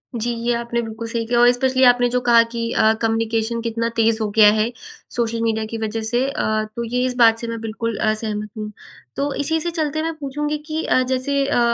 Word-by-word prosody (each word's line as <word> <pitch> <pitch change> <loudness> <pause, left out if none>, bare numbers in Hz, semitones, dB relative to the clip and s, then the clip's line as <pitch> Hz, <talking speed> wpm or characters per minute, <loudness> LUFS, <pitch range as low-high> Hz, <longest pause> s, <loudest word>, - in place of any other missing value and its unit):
जी, 235 +1 -1 0.2
ये 240 - +3
आपने 235 0 -2
बिल्कुल 225 0 -6
सही 230 0 -3
किया 240 0 +2
और 240 - +6
एस्पेशली 260 +1 +2
आपने 245 0 +5
जो 250 +1 +1
कहा 235 -1 +5
कि 230 -1 -3
अ, 220 0 +4
कम्युनिकेशन 225 0 0
कितना 230 0 -2
तेज़ 225 0 +2
हो 215 - 0
गया 215 -2 +8
है 220 +2 +1 0.4
सोशल 230 -1 -1
मीडिया 220 -1 0
की 230 - -3
वज़ह 220 0 -3
से। 240 +3 0
अ, 215 -5 -1
तो 235 - -3
ये 245 +2 -1
इस 255 -1 -2
बात 225 -2 +5
से 235 - -5
मैं 230 0 -4
बिल्कुल 225 0 -3
अ, 215 -1 +1
सहमत 215 -1 -4
हूँ। 210 0 -5 0.4
तो 280 0 -1
इसी 320 +3 -1
से 345 - -2
चलते 310 -2 -2
मैं 325 0 -2
पूछूँगी 295 +1 -3
कि 315 0 -2
अ, 255 - +3
जैसे 275 +2 0
अ, - - +1
235 Hz, 230 wpm, -21 LUFS, 225-255 Hz, 0.4 s, गया